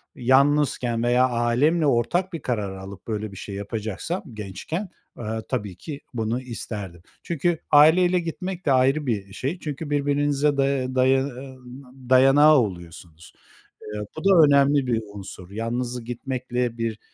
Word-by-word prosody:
yalnızken 130 Hz, -2 st, +2 dB
veya 125 Hz, +1 st, +3 dB
ailemle 125 Hz, +7 st, +2 dB
ortak 165 Hz, +9 st, +1 dB
bir 165 Hz, -, -5 dB
karar 105 Hz, -7 st, -2 dB
alıp 95 Hz, +1 st, -10 dB
böyle 110 Hz, -2 st, -3 dB
bir 100 Hz, -, -11 dB
şey 100 Hz, -, -7 dB
yapacaksam 110 Hz, -, -4 dB
gençken, 110 Hz, -, -5 dB, 0.3 s
eee, 120 Hz, -, -7 dB, 0.3 s
tabii 105 Hz, -8 st, -3 dB
ki 145 Hz, -, -8 dB
bunu 115 Hz, +1 st, -2 dB
isterdim. 105 Hz, -8 st, -6 dB, 0.2 s
Çünkü 170 Hz, +1 st, 0 dB
aileyle 175 Hz, +5 st, +6 dB
gitmek 180 Hz, +2 st, -5 dB
de 145 Hz, -, +2 dB
ayrı 135 Hz, +3 st, +3 dB
bir 100 Hz, -6 st, -3 dB
şey. 145 Hz, -, -3 dB
Çünkü 150 Hz, -1 st, -5 dB
birbirinize 145 Hz, 0 st, +1 dB
day 135 Hz, -2 st, 0 dB
daya 130 Hz, +1 st, +3 dB, 0.8 s
dayanağı 135 Hz, +4 st, +6 dB
oluyorsunuz. 85 Hz, -5 st, -6 dB, 0.5 s
Eee, 105 Hz, 0 st, -6 dB, 0.2 s
bu 160 Hz, -, -6 dB
da 185 Hz, -5 st, +6 dB
önemli 140 Hz, -1 st, +3 dB
bir 115 Hz, -2 st, +1 dB
unsur. 95 Hz, -2 st, -9 dB
Yalnız 120 Hz, +3 st, -3 dB
gitmekle 125 Hz, 0 st, -3 dB
bir 115 Hz, -2 st, -3 dB
130 Hz, 135 wpm, -24 LUFS, 110-145 Hz, 0.8 s, aileyle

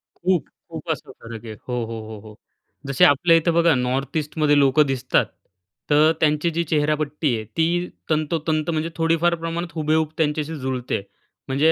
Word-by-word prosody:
खूप, 180 Hz, -1 st, 0 dB, 0.2 s
खूप -, -, -8 dB
असा -, -, -5 dB
फरक 115 Hz, 0 st, -9 dB
आहे. 110 Hz, -, -6 dB
हो, 125 Hz, -, -4 dB
हो, 115 Hz, 0 st, -6 dB
हो, 110 Hz, -2 st, -8 dB
हो. 105 Hz, -, -12 dB, 0.5 s
जसे 140 Hz, -2 st, +4 dB
आपल्या 165 Hz, +4 st, +5 dB
इथं 165 Hz, +1 st, +1 dB
बघा 170 Hz, -1 st, +4 dB
नॉर्थ 130 Hz, +4 st, -1 dB
ईस्टमध्ये 150 Hz, -1 st, +1 dB
लोकं 140 Hz, +2 st, +4 dB
दिसतात, 130 Hz, -2 st, +1 dB, 0.6 s
तर 150 Hz, +2 st, +5 dB
त्यांची 150 Hz, +2 st, +2 dB
जी 170 Hz, +1 st, 0 dB
चेहरापट्टी 150 Hz, -3 st, 0 dB
आहे, 110 Hz, -, -4 dB
ती 175 Hz, +2 st, +1 dB, 0.2 s
तंतोतंत 155 Hz, 0 st, 0 dB
म्हणजे 160 Hz, 0 st, -1 dB
थोडीफार 165 Hz, +1 st, +2 dB
प्रमाणात 165 Hz, +1 st, -4 dB
हुबेहूब 155 Hz, 0 st, +1 dB
त्यांच्याशी 155 Hz, 0 st, -1 dB
जुळते. 130 Hz, -4 st, -2 dB, 0.5 s
म्हणजे 145 Hz, +5 st, +3 dB
155 Hz, 160 wpm, -22 LUFS, 135-165 Hz, 0.6 s, आपल्या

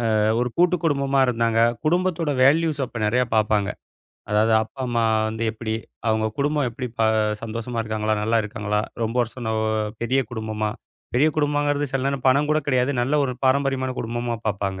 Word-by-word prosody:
அ, -, -, +3 dB, 0.2 s
ஒரு 125 Hz, 0 st, 0 dB
கூட்டுக்குடும்பமா 150 Hz, -6 st, +2 dB
இருந்தாங்க. 115 Hz, -2 st, +1 dB, 0.3 s
குடும்பத்தோட 170 Hz, -2 st, +1 dB
வேல்யூஸ் 150 Hz, +1 st, +3 dB
அப்போ 120 Hz, -, -7 dB
நெறைய 125 Hz, +4 st, +2 dB
பாப்பாங்க. 105 Hz, -2 st, +2 dB, 0.6 s
அதாவது 110 Hz, +2 st, +3 dB
அப்பா, 120 Hz, +4 st, -10 dB
அம்மா 115 Hz, -1 st, +1 dB, 0.2 s
வந்து 110 Hz, +1 st, -4 dB
எப்பிடி? 110 Hz, 0 st, -4 dB, 0.3 s
அவுங்க 110 Hz, 0 st, +1 dB
குடும்பம் 145 Hz, -1 st, +1 dB
எப்படி 125 Hz, +2 st, -5 dB
ப -, -, -1 dB
ஆ, -, -, +4 dB, 0.3 s
சந்தோஷமா 115 Hz, +1 st, -4 dB
இருக்காங்களா? 110 Hz, -1 st, -1 dB
நல்லா 115 Hz, +2 st, +2 dB
இருக்காங்களா? 105 Hz, -1 st, -2 dB, 0.2 s
ரொம்ப 115 Hz, +2 st, -3 dB
வருஷம் 120 Hz, 0 st, -5 dB
ஒ 110 Hz, -, 0 dB, 0.4 s
பெரிய 130 Hz, +3 st, +2 dB
குடும்பமா? 110 Hz, -2 st, -3 dB, 0.4 s
பெரிய 145 Hz, +6 st, +4 dB
குடும்பங்கிறது 145 Hz, -1 st, +1 dB
சில 135 Hz, -1 st, 0 dB
நேரம் 140 Hz, -2 st, -2 dB
பணம் 140 Hz, +3 st, +3 dB
கூட 155 Hz, -, +3 dB
கிடையாது. 130 Hz, -1 st, +2 dB
நல்ல 130 Hz, +5 st, 0 dB
ஒரு 130 Hz, -, -2 dB
பாரம்பரியமான 130 Hz, -1 st, +1 dB
குடும்பமா 120 Hz, +1 st, -2 dB
பார்ப்பாங்க. 100 Hz, -2 st, -2 dB
125 Hz, 160 wpm, -23 LUFS, 110-140 Hz, 0.6 s, ஆ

